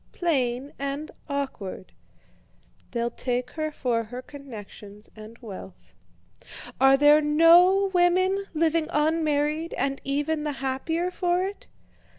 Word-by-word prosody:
Plain 270 -5 -1
and 280 +2 -4 0.2
awkward! 265 -10 -5 1.0
They'll 235 -1 -2
take 250 +1 -3
her 310 -1 -3
for 235 -5 -1
her 245 +3 -8
connections 210 -7 -11
and 215 +1 -12
wealth. 195 -4 -11 0.9
Are 270 0 +6
there 295 +2 +6
no 345 +6 +5
women 370 +2 +2
living 320 0 +1
unmarried, 305 +1 0
and 275 0 -2
even 290 +3 -1
the 300 -1 -2
happier 280 +7 -2
for 355 0 0
it?" 395 +2 -6
290 Hz, 115 wpm, -25 LUFS, 255-330 Hz, 1.0 s, Are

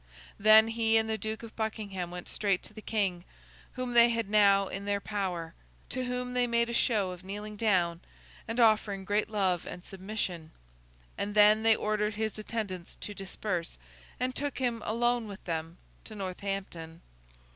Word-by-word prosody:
Then, 215 +2 +7
he 225 -1 +3
and 220 0 +2
the 220 - 0
Duke 220 +1 -4
of 225 - -10
Buckingham 210 -5 -3
went 180 0 -7
straight 200 -3 0
to - - -12
the 215 - -9
King 195 -6 -1 0.5
(whom 255 -1 -4
they 235 0 +7
had 230 -3 -2
now 200 -2 +5
in 195 +1 -5
their 205 0 0
power), 185 -6 -3 0.4
to 255 0 -2
whom 250 0 -3
they 250 -1 +2
made 235 0 +2
a - - -3
show 210 -6 +2
of 180 0 -9
kneeling 210 +2 -6
down, 180 -6 +1 0.5
and 225 +2 -3
offering 215 -4 +3
great 205 +2 0
love 190 -5 0
and 180 - -8
submission; 190 -4 -4 0.7
and 205 +1 -2
then 210 +1 +7
they 225 0 +5
ordered 210 0 -1
his 220 0 -2
attendants 205 -5 -5
to 205 - -7
disperse, 190 - -4 0.4
and 255 +1 0
took 285 +2 -3
him, 240 -3 -1
alone 240 +1 +1
with 200 -1 -9
them, 165 0 -4 0.3
to 215 - -9
Northampton. 185 -4 -5
210 Hz, 170 wpm, -30 LUFS, 190-225 Hz, 0.7 s, Then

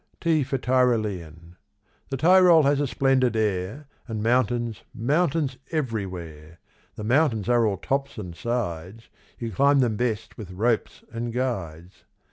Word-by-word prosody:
T 160 -3 +2
for 135 +1 -2
Tyrolean. 105 - -1 0.5
The 135 - -3
Tyrol 175 +1 +6
has 140 0 +2
a 145 - 0
splendid 130 -3 +2
air 105 +5 -2 0.2
And 110 -3 -4
mountains, 120 -2 0
mountains 145 +1 0
everywhere; 90 - -5 0.4
The 105 - -7
mountains 120 -3 +2
are 120 -2 +3
all 100 -2 -1
tops 140 +4 -2
and 90 -5 -7
sides, 110 -2 -4 0.3
You 115 -1 -5
climb 140 +8 +3
them 115 -5 +1
best 115 -2 -3
with 105 -4 -8
ropes 110 +5 -1
and 115 +1 -3
guides. 95 -9 -4
120 Hz, 135 wpm, -25 LUFS, 100-135 Hz, 0.5 s, Tyrol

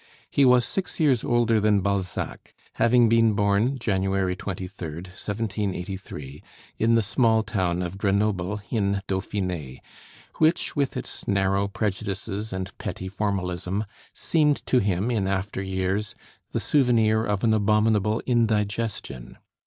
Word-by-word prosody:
He 140 - +4
was 125 -1 +5
six 190 +8 -3
years 140 -7 +3
older 120 -2 +2
than 105 -1 +3
Balzac, 95 -2 -3 0.2
having 120 0 +4
been 115 -1 +4
born 100 +6 +2
January 95 -4 0
23d, 90 -3 -6
1783, 95 -7 -4 0.4
in 115 +1 +3
the 115 - +3
small 110 +1 +2
town 90 -5 -1
of 90 +2 -5
Grenoble, 100 -1 0
in 100 -3 0
Dauphiné, 90 -8 -3 0.6
which, 160 +2 +2
with 140 -3 0
its - - -6
narrow 100 0 +1
prejudices 100 +1 -3
and 95 0 -5
petty 95 - -5
formalism, 95 -1 -2 0.3
seemed 150 -3 +1
to 130 - +3
him 100 +2 0
in 105 -5 0
after 95 0 -2
years 95 +2 -2 0.4
"the - - -1
souvenir 115 -6 +3
of 105 -3 -1
an 110 -2 +4
abominable 105 0 +2
indigestion." 105 - -1
100 Hz, 125 wpm, -25 LUFS, 95-115 Hz, 0.6 s, was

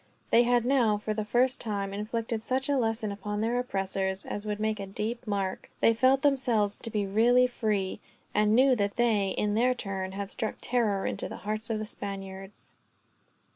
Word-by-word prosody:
They 235 - +7
had 240 -1 +2
now, 245 -5 +3
for 215 +1 -3
the 215 0 -2
first 250 +5 +1
time, 200 -3 -2
inflicted 220 +2 -3
such 260 +4 -1
a 285 - +3
lesson 225 -4 0
upon 205 +1 -4
their 235 +2 +1
oppressors 195 -4 -2
as 205 +1 -5
would 210 0 -2
make 215 0 -1
a 195 - -5
deep 220 +5 -4
mark. 195 -2 -2
They 230 - +5
felt 260 +3 +3
themselves 240 -8 +2
to - - -5
be 210 -2 -1
really 235 +5 +4
free; 210 -6 -1 0.3
and 210 +1 +3
knew 260 +1 +5
that 200 -1 0
they, 220 -5 +2
in 210 0 +1
their 250 +4 +3
turn, 190 -4 -4
had 200 0 -5
struck 220 -4 -3
terror 220 -5 0
into - - -3
the - - -7
hearts 215 +2 -3
of 225 - 0
the 215 - -3
Spaniards. 195 -1 -7
215 Hz, 190 wpm, -28 LUFS, 200-240 Hz, 0.3 s, They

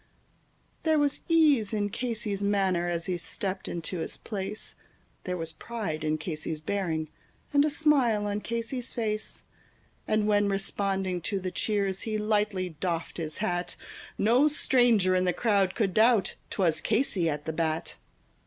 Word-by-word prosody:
There 315 -1 +3
was 290 -1 +1
ease 290 -10 +4
in 205 -1 0
Casey's 220 -4 -2
manner 190 -4 +2
as 170 -1 -2
he 180 -2 -1
stepped 190 +3 -3
into 170 +1 -4
his 160 - -3
place, 205 0 -5 0.5
There 180 -1 -2
was 165 -1 -4
pride 195 -10 -4
in 155 0 +1
Casey's 155 -1 -4
bearing, 160 -2 -1 0.5
and 285 0 +6
a 305 - +2
smile 270 -9 +3
on 205 0 -1
Casey's 235 +3 -3
face; 215 -2 -3 0.6
And 215 -1 +2
when, 205 -1 +3
responding 195 -2 -1
to 195 +3 -2
the 185 -1 -4
cheers, 195 0 0
he 215 -1 -2
lightly 210 -3 0
doffed 170 -3 -2
his 155 -2 -4
hat, 175 -1 -1 0.4
No 245 +8 +4
stranger 240 -10 +3
in 185 0 +2
the 180 - +2
crowd 200 -5 +2
could 195 -5 +1
doubt 220 -2 +4 0.2
'twas 165 -5 +1
Casey 210 -7 +1
at 150 -1 -3
the 160 - -2
bat. 160 0 -2
200 Hz, 155 wpm, -28 LUFS, 175-225 Hz, 0.6 s, and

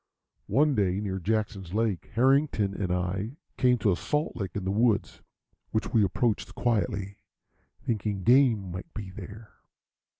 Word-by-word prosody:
One 150 +2 +3
day, 95 -5 +1
near 95 -2 -3
Jackson's 100 -2 -2
Lake, 110 -5 0
Harrington 130 -4 +3
and 100 -2 -2
I 95 - -2 0.2
came 125 -1 +3
to 105 -2 +2
a - - +2
salt 150 - -1
lick 95 -5 -5
in 100 - -2
the 95 - 0
woods, 110 +1 +1 0.5
which 110 -1 -2
we 110 - +5
approached 105 +3 0
quietly, 105 -4 -1 0.7
thinking 105 -4 -1
game 120 -6 +4
might 90 +2 -7
be 100 -3 -6
there. 110 +3 -10
105 Hz, 145 wpm, -28 LUFS, 95-120 Hz, 0.7 s, we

